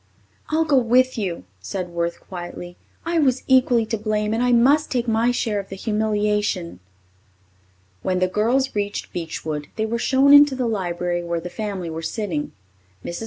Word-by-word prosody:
"I'll 320 +1 +1
go 295 -3 +3
with 255 +2 +3
you," 180 - -3 0.2
said 180 - -5
Worth 170 0 -3
quietly. 175 -1 -8 0.3
"I 335 0 +1
was 260 -4 +2
equally 250 -3 +4
to 225 -1 -3
blame 210 0 -1
and 225 - 0
I 250 0 +2
must 270 +6 +4
take 245 -2 -1
my 225 +1 +2
share 225 -4 0
of 195 - -8
the 195 - -6
humiliation." 210 - -1 1.2
When 185 -1 0
the 185 0 +2
girls 235 +8 +1
reached 205 0 -3
Beechwood, 155 -3 -4
they 220 - -1
were 235 +1 -2
shown 270 +3 +4
into 290 -1 +7
the 255 -1 -1
library 175 -5 -2
where 170 0 -2
the 175 +1 -7
family 200 -6 -4
were 160 +1 -5
sitting. 165 -5 -3 0.5
Mrs. 170 - -5
210 Hz, 170 wpm, -22 LUFS, 175-245 Hz, 1.2 s, into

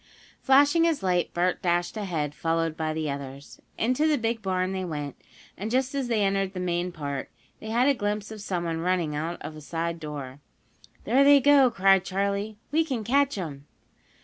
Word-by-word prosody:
Flashing 285 +5 +5
his 325 -9 0
light, 180 -2 +1
Bert 180 +1 0
dashed 175 0 0
ahead, 165 -9 -2
followed 165 0 -1
by 160 -1 -2
the 155 0 -2
others. 140 0 -7 0.2
Into 255 +7 +1
the 305 -2 +3
big 230 0 -1
barn 185 -2 -1
they 190 -1 -3
went, 150 -5 -5 0.4
and, 210 +3 -5
just 260 +3 0
as 275 -3 -1
they 225 -3 +1
entered 195 -1 0
the 185 - -5
main 180 0 -1
part, 140 -5 -5 0.3
they 220 - -8
had 240 +4 +2
a 285 - +5
glimpse 210 -2 -3
of 215 -1 -8
someone 170 -4 -2
running 170 -3 0
out 165 +3 -3
of 155 - -7
a 155 - -10
side 170 +2 -3
door. 145 -4 -7 0.6
"There 270 +3 +4
they 285 0 +7
go!" 275 -1 +6
cried 195 -4 +4
Charley. 200 +2 -2
"We 320 +2 +3
can 260 -8 -3
catch 275 +2 +2
'em!" 145 -6 -6
185 Hz, 190 wpm, -26 LUFS, 165-230 Hz, 0.6 s, they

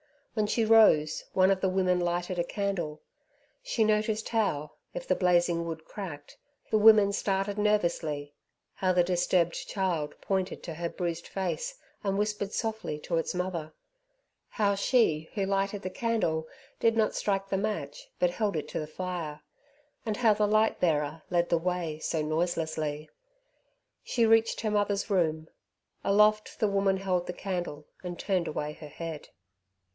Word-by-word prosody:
When 215 -2 +1
she 225 +1 +1
rose 210 -9 +5
one 190 0 +5
of 190 -1 +1
the 190 - +2
women 185 -1 +2
lighted 175 +1 -1
a - - +3
candle. 175 -5 -3 0.6
She - - 0
noticed 215 0 +1
how, 175 -10 0 0.2
if - - -4
the - - +4
blazing 175 -2 +2
wood 160 -1 -6
cracked, 155 -8 -8 0.3
the 215 - +4
women 210 -2 +7
started 200 +1 -1
nervously, 170 -8 0 0.4
how 185 -1 +1
the 180 -1 +4
disturbed 175 -1 +1
child 175 -7 -1
pointed 190 -1 -2
to 165 - -5
her 170 +1 -3
bruised 170 -2 -4
face, 485 - -3 0.3
and 195 -1 0
whispered 210 -1 -1
softly 220 -9 -2
to 165 +2 -2
its 165 - -1
mother, 175 -4 -3 0.8
how 205 -2 +2
she 195 -7 +2
who 195 - 0
lighted 195 +1 -1
the 185 - -2
candle 185 -7 -1 0.3
did 225 0 +3
not 220 -1 +2
strike 195 -1 -1
the 195 - +1
match 195 -9 -3
but 180 -1 +2
held 205 0 -1
it 155 - -3
to - - -3
the 155 - -4
fire, 165 -2 -5 0.6
and 215 -3 -2
how 230 -3 +5
the 210 0 +1
light 215 +1 +3
bearer 155 -2 +1
led 175 -1 +1
the 170 - +3
way 170 -3 -2
so 160 0 -1
noiselessly. 155 -2 -1 1.0
She 235 -2 +2
reached 225 0 +3
her 215 - -1
mother's 205 0 0
room. 160 -4 +1 0.5
Aloft 210 +1 +3
the 215 - +2
woman 195 -1 +2
held 185 -2 -1
the 180 - -3
candle 175 -6 -4 0.2
and 175 -1 -6
turned 185 -3 0
away 150 0 -3
her 150 - -10
head. 165 0 -7
185 Hz, 160 wpm, -29 LUFS, 165-210 Hz, 1.0 s, women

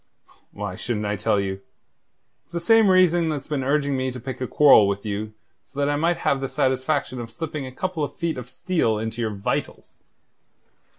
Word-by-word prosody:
"Why 100 -2 -5
shouldn't 105 0 -3
I 105 0 -1
tell 105 - +1
you? 95 0 -3 0.8
It's - - -28
the 170 - -1
same 220 +4 +5
reason 175 -3 +4
that's 145 -3 -3
been 145 -3 -2
urging 140 +1 +1
me 130 0 -1
to 125 0 -7
pick 130 +1 -7
a 130 - -1
quarrel 140 -8 +6
with 100 +1 -2
you 105 +1 -3 0.3
so 135 - -20
that 140 0 +1
I - - +1
might 170 +4 +1
have 135 - +2
the 135 - -3
satisfaction 130 0 0
of 115 - -7
slipping 150 -1 -5
a - - -8
couple 175 +3 -3
of 145 - -4
feet 165 -6 -2
of 125 0 -9
steel 160 - 0
into 110 +2 -4
your 110 - 0
vitals. 100 -2 -4
130 Hz, 200 wpm, -23 LUFS, 110-155 Hz, 0.8 s, quarrel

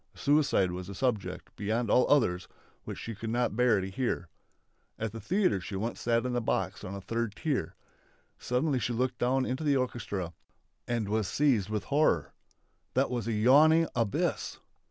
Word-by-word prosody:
Suicide 140 -11 +2
was 90 +1 -6
a 100 - -7
subject, 115 -3 -2
beyond 110 +2 -1
all 125 - +4
others, 110 -11 +2 0.4
which - - -6
she 115 - -6
could 110 +2 -6
not 120 -2 0
bear 120 -3 +4
to 95 - -3
hear. 95 -6 -2 0.7
At 110 -1 -3
the 115 - -7
theatre 175 - +1
she 95 - -6
once 110 +5 -3
sat 115 0 +1
in 125 -1 -1
a 120 - +1
box 95 -4 -1
on 95 - -6
the 100 - -6
third 115 +1 -2
tier. 150 0 -2 0.6
Suddenly 130 +2 0
she 120 0 -1
looked 125 +2 -1
down 130 +1 +2
into 130 +5 -3
the 145 -2 +3
orchestra 100 -9 -3 0.5
and 115 -3 -1
was 105 -1 0
seized 120 -9 +2
with 105 -2 -2
horror. 140 - +1 0.6
That - - +2
was 120 -3 -2
a 115 - 0
yawning 150 +9 +5
abyss! 115 -5 -1
115 Hz, 175 wpm, -30 LUFS, 100-130 Hz, 0.7 s, yawning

